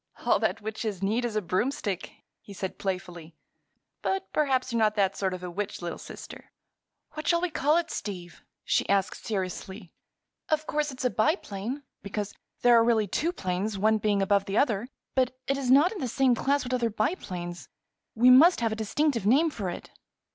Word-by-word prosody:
"All - - +4
that - - 0
witches 215 -2 -4
need 225 +5 +1
is 230 -3 -3
a 215 - 0
broomstick," 195 0 -2 0.3
he 200 - -12
said 190 -1 -5
playfully. 175 -4 -5 0.7
"But 385 0 -2
perhaps 260 -4 +1
you're 230 - +1
not 215 -1 +3
that 195 -2 +2
sort 190 -1 -1
of 180 0 -6
a 180 - -5
witch, 200 +3 -4
little 175 -1 -5
sister." - - -10 0.6
"What 310 0 -6
shall 340 - +4
we 360 0 -1
call 300 +2 +2
it, 340 -1 -1
Steve?" 180 -4 -6 0.2
she - - +1
asked, 195 -1 +1
seriously. 190 -2 -4 0.6
"Of 310 0 +1
course 300 0 -1
it's 255 -1 -5
a 250 - +2
biplane, 245 - -1 0.2
because 205 0 -4 0.3
there 245 -1 +7
are - - +5
really 230 -2 +3
two 310 - -1
planes, 195 - -2
one 215 +2 +3
being 205 -1 +1
above 200 0 +2
the 195 +2 -2
other; 235 -4 +2 0.3
but 255 -1 +1
it 275 - +1
is 270 -2 -2
not 285 +7 +6
in 430 - -6
the 260 - -2
same 255 +2 +3
class 280 +4 +1
with 255 0 -4
other 240 -2 +1
biplanes. 185 - -3 0.5
We 245 +3 +6
must 320 +8 +7
have 225 -1 +1
a - - -1
distinctive 240 -1 0
name 300 +8 +4
for 200 -9 -4
it." 175 - -8
220 Hz, 190 wpm, -27 LUFS, 195-270 Hz, 0.7 s, there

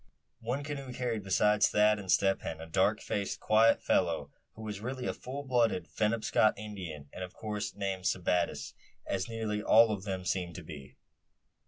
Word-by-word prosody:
One 125 +5 -3
canoe 140 -3 -5
carried, 120 -3 -2
besides 105 +2 +3
Thad 105 0 +4
and 95 -2 -3
Step 95 -1 +3
Hen, 80 - -5
a 80 - -7
dark 80 - +1
faced, 100 -1 -3
quiet 110 +1 +4
fellow, - - +1 0.2
who 110 - -9
was 105 -2 -5
really 130 +2 -4
a - - -1
full 135 +3 -7
blood 120 -4 +3 0.3
Penobscot 110 0 +2
Indian, 90 -9 -7
and 95 - -6
of 90 - -8
course 105 -1 -4
named 95 -2 -3
Sebattis, 90 -6 0 0.3
as 95 +1 -2
nearly 110 -2 -2
all 115 +1 +6
of 100 -3 -2
them 95 -2 -4
seem 90 -2 -1
to 90 - -8
be. 75 -4 -11
105 Hz, 175 wpm, -31 LUFS, 95-115 Hz, 0.3 s, all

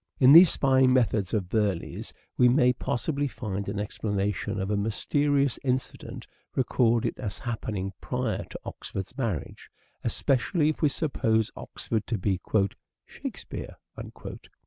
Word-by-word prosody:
In 130 +1 +8
these 170 +2 +10
spying 130 -1 +4
methods 115 -6 +2
of 100 -5 0
Burleigh's 100 -3 -1 0.2
we 125 - +5
may 125 -1 +4
possibly 140 +4 -1
find 100 -5 -4
an 100 0 -3
explanation 105 0 -2
of 95 +2 -2
a - - +2
mysterious 140 +6 +1
incident 130 -1 -3 0.3
recorded 120 -3 +1
as 105 -5 -4
happening 105 -5 -4
prior - - -2
to - - -9
Oxford's 95 +5 -6
marriage, 115 - -4 0.3
especially 150 +4 +1
if 155 - -3
we 150 - +4
suppose 110 -7 0
Oxford 110 -2 -4
to 115 - -1
be 95 -1 0 0.5
" - - -63
Shakespeare." - - -7
115 Hz, 130 wpm, -27 LUFS, 105-130 Hz, 0.5 s, these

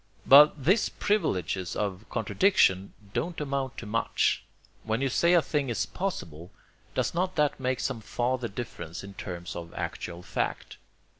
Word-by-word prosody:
But 145 0 +7
these 195 +7 +4
privileges 95 - -1
of 100 0 -3
contradiction 110 - +2 0.2
don't 175 0 -2
amount 135 -3 -2
to - - -6
much. 115 +2 +1 0.4
When 110 +1 -1
you 135 0 +1
say 170 +7 +3
a 170 - +5
thing 145 -4 -1
is 115 -2 0
possible, 90 - -5 0.5
does - - 0
not 185 +2 -1
that 150 -3 +1
make 130 -1 -1
some 130 -5 -2
farther 120 +3 -1
difference 100 -7 -7
in 100 0 -9
terms 90 -2 -6
of 85 -1 -7
actual 85 0 -5
fact? 90 0 -3
120 Hz, 150 wpm, -28 LUFS, 95-150 Hz, 0.5 s, But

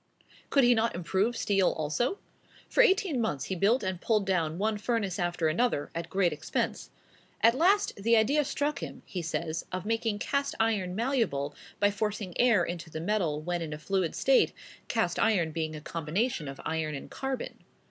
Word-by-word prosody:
Could 275 - +4
he 245 0 +6
not 230 -2 +1
improve 190 +7 0
steel 195 -3 +2
also? 160 - -1 0.5
For - - +4
eighteen 380 - +3
months 145 - -1
he 190 - -3
built 210 +8 +2
and 185 -2 -3
pulled 215 -3 +1
down 170 -4 0
one 210 +2 0
furnace 210 -5 -1
after 175 -2 0
another, 155 -2 0
at 170 0 -4
great 185 -4 +2
expense. 150 - -3 0.5
At 230 +1 +6
last 380 +9 +3
"the 230 +4 +2
idea 280 +8 +3
struck 290 +1 -1
him," - - -7
he 180 - -4
says, 165 0 -3
of 185 +1 -4
making 225 -1 0
cast 280 +6 -1
iron 205 -5 +1
malleable 220 - 0 0.3
by 205 0 +4
forcing 205 -2 -3
air 230 -7 +5
into 170 -1 -5
the 160 - -5
metal 165 -5 0
when 175 +1 -2
in 155 -2 -4
a - - -5
fluid 180 +1 -1
state, 270 0 +3 0.3
cast 180 -7 0
iron 185 -8 +2
being 155 -1 -3
a 155 - -7
combination 165 - -2
of 135 0 -7
iron 160 -2 -1
and 140 - -8
carbon. 265 -1 -4
195 Hz, 180 wpm, -29 LUFS, 165-230 Hz, 0.5 s, he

